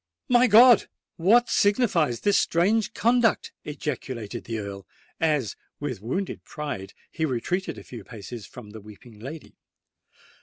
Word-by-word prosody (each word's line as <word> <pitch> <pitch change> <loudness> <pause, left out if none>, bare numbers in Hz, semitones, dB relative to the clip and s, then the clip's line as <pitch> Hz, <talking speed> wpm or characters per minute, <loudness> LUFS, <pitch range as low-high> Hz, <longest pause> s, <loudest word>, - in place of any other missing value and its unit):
"My 245 0 +5
God! 235 +2 +7 0.3
what 230 +8 +4
signifies 195 - +2
this 205 -1 +3
strange 200 +6 +1
conduct?" 235 0 +2
ejaculated 130 -6 -5
the 115 -1 -4
Earl, 100 -2 -7 0.3
as, 150 -10 0 0.2
with 130 -8 -4
wounded 180 - -3
pride, 145 - -6 0.2
he 160 - -4
retreated 160 +5 -2
a 100 - -10
few 120 +2 -10
paces 110 -1 -9
from 110 -4 -12
the 110 0 -10
weeping 105 +2 -14
lady. 145 +7 -10
150 Hz, 130 wpm, -25 LUFS, -, 0.3 s, God